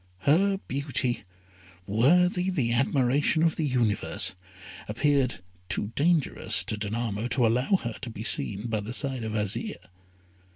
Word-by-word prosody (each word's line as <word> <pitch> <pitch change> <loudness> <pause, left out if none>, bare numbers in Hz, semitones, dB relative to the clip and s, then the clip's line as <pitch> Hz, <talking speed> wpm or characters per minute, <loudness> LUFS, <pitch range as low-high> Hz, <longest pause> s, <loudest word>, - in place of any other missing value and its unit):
Her 195 - +3
beauty, 130 -4 -1 0.6
worthy 180 - +3
the 130 -11 0
admiration 135 +5 +2
of 165 -1 +2
the 155 - -1
universe, 120 -6 +1 0.6
appeared 130 - +1 0.3
too 100 +2 -2
dangerous 160 0 +1
to - - -3
Danamo 110 +1 -3
to 125 0 +2
allow 125 - +2
her 120 -2 -3
to 120 - -5
be 110 -1 -7
seen 105 -3 +2
by 110 -2 -1
the 110 +4 -5
side 135 -4 -2
of 110 -1 -4
Azire. 105 -2 -3
125 Hz, 135 wpm, -27 LUFS, 110-145 Hz, 0.6 s, Her